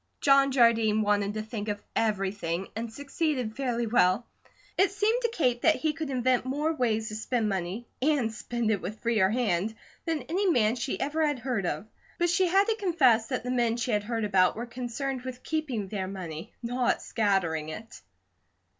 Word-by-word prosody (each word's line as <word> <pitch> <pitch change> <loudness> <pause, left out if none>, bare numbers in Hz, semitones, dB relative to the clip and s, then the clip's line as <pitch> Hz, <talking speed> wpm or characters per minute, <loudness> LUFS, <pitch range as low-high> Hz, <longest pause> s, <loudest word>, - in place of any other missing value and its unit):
John 275 -1 +5
Jardine 225 -4 +4
wanted 205 0 +1
to 215 - -2
think 215 -1 -5
of 205 -1 -2 0.2
everything, 195 -4 -1
and 225 +1 -4
succeeded 280 -4 -2
fairly 245 -3 -1
well. 215 -1 +3 0.5
It 385 +2 +4
seemed 430 +5 +1
to 470 - +1
Kate 250 - +1
that 320 - +5
he 310 -1 0
could 315 -1 -4
invent 255 -1 +1
more 290 +5 -1
ways 225 -6 0
to 215 - -6
spend 220 +1 -1
money, 195 +3 -3 0.2
and 265 -6 +2
spend 235 -1 -2
it 205 - 0
with 205 +5 -6
freer 220 -5 +3
hand, 220 -2 0 0.3
than 320 -5 -1
any 370 +9 0
man 230 -7 +3
she 250 +2 -3
ever 305 +3 0
had 295 -3 +1
heard 240 -7 -2
of, 155 +6 -3 0.3
but 345 0 +2
she 365 +1 +3
had 385 +3 +5
to 445 +1 0
confess 265 - +3
that 255 -4 -2
the 250 - -3
men 240 -2 +1
she 240 +1 -1
had 210 -1 +1
heard 225 -1 -1
about 190 -3 +3
were 235 - -4
concerned 250 +2 -4
with 255 0 -7
keeping 275 -10 -2
their 190 -1 -3
money, 170 -5 -7
not 245 +1 0
scattering 180 -8 0
it. 220 +8 -9
235 Hz, 190 wpm, -28 LUFS, 210-275 Hz, 0.5 s, John